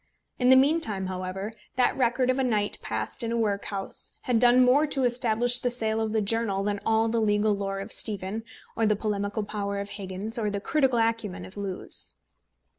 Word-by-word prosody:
In 250 0 +3
the 260 - +8
meantime, 265 -8 +2
however, 185 +3 -4 0.2
that 250 -1 +2
record 255 0 +2
of 255 - -2
a - - +2
night 215 -5 0
passed - - -4
in 230 -1 -2
a 235 - 0
workhouse 200 -3 -3
had 245 -3 +1
done 250 +1 +6
more 280 +5 +4
to 270 -2 -1
establish 245 0 +3
the 245 - 0
sale 225 -2 +1
of 220 -1 -1
the 220 -1 +1
journal 200 -2 0
than 205 0 -1
all 225 0 +2
the 225 0 0
legal 210 0 +2
lore 195 -1 -3
of 195 +3 -7
Stephen, 205 +1 -1 0.3
or 225 - +1
the 210 - +3
polemical 205 0 -2
power 200 -1 -3
of 200 0 -5
Higgins, 205 +4 -4
or 210 -2 0
the 200 0 -3
critical 265 +2 +1
acumen 225 -5 -1
of 185 - -13
Lewes. 200 -2 -4
220 Hz, 195 wpm, -27 LUFS, 200-245 Hz, 0.3 s, the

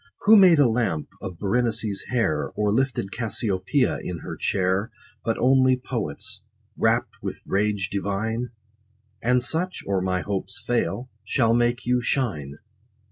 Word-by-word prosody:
Who 220 +2 +7
made 185 -5 +7
a 145 -3 +6
lamp 110 -11 -1
of 90 -2 -6
Berenice's 110 -1 -1
hair 115 -12 0
Or 105 -1 +1
lifted 130 -5 0
Cassiopea 110 +2 0
in 85 -3 -5
her - - -6
chair, 95 +3 0 0.3
But 115 0 0
only 130 0 +4
poets, 115 - -5 0.3
rapt - - 0
with - - -5
rage 100 0 0
divine? 110 +4 -2 0.7
And 125 +2 +2
such, 180 +7 -2
or 100 -2 0
my 90 0 0
hopes 100 +4 -3
fail, 120 +1 -1
shall 115 +2 +2
make 120 0 +1
you 125 0 +2
shine. 80 - -1
115 Hz, 135 wpm, -24 LUFS, 95-125 Hz, 0.7 s, Who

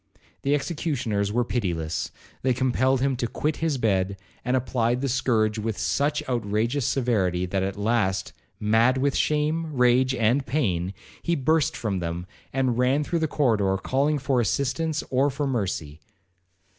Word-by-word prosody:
The 140 +1 +2
executioners 135 - -1
were 120 +3 +2
pitiless. 85 - -2 0.3
They 130 -1 +1
compelled 130 +1 +2
him 135 0 +1
to 120 - -1
quit 150 +6 -2
his 160 -4 0
bed, 100 -4 +1 0.3
and 125 +1 +1
applied 120 0 0
the 140 - 0
scourge 115 -4 +1
with 110 -1 -2
such 140 - 0
outrageous 115 +2 0
severity, 95 -9 +1
that 95 +1 -1
at 95 +1 -2
last, 100 -3 0 0.3
mad 115 +5 +3
with 140 +1 +1
shame, 155 +2 0
rage, 125 0 +3
and 120 +5 +2
pain, 95 - -1 0.3
he 170 - 0
burst 155 +1 +1
from 100 -5 -2
them, 85 0 -4 0.3
and 130 -3 0
ran 130 +4 +3
through 170 +3 -1
the 160 - +1
corridor 110 -10 +2
calling 140 +9 +1
for 135 -2 +1
assistance 150 +7 0
or 135 +2 +3
for 145 +2 -2
mercy. 95 - -2
125 Hz, 155 wpm, -25 LUFS, 105-140 Hz, 0.3 s, mad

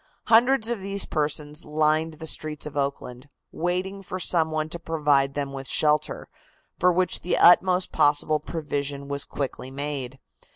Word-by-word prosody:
Hundreds 235 +1 +4
of 235 - -2
these 195 0 +1
persons 150 0 -2
lined 155 +1 0
the 160 +1 -9
streets 155 -2 0
of 150 - -8
Oakland, 140 -2 -4 0.2
waiting 185 +3 -3
for 185 -1 -6
some 165 -3 +1
one 155 0 -2
to 170 +2 -6
provide 145 -4 +1
them 140 -1 -3
with 135 -1 -7
shelter, 150 -1 +1 0.5
for 180 - +4
which 180 +1 0
the 180 - 0
utmost 180 +1 +5
possible 150 +1 +2
provision 145 -3 -4
was 140 0 -1
quickly 130 -2 -5
made. 135 -2 -5
155 Hz, 155 wpm, -25 LUFS, 140-175 Hz, 0.5 s, utmost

